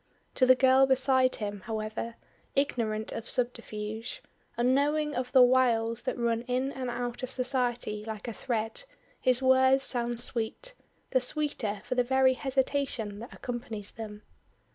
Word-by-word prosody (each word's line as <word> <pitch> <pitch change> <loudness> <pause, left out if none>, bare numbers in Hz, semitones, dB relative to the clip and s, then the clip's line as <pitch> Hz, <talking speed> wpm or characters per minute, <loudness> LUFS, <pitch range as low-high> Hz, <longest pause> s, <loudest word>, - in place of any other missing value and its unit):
To 255 - +3
the 255 - +8
girl 265 +1 +5
beside 260 -1 +3
him, 205 -1 -4
however, 220 +1 -4 0.4
ignorant 225 -6 0
of 230 0 -6
subterfuge, 230 - -2 0.3
unknowing 290 +5 +2
of 250 -1 -3
the 260 -2 +7
wiles 240 -2 +3
that - - -3
run 230 -1 0
in 255 +2 0
and 260 -2 -4
out 245 0 -4
of 255 - -4
society 245 -5 -1
like 220 +1 -6
a 235 - -3
thread, 225 - -3 0.3
his 255 0 +1
words 260 +1 +5
sound 240 -2 +1
sweet 240 - -3 0.4
the 260 - +3
sweeter 250 -7 -2
for 255 - -2
the 250 0 +2
very 265 +1 +4
hesitation 265 -5 -1
that 235 - -9
accompanies 225 -4 -5
them. 210 -2 -8
245 Hz, 145 wpm, -29 LUFS, 225-260 Hz, 0.4 s, the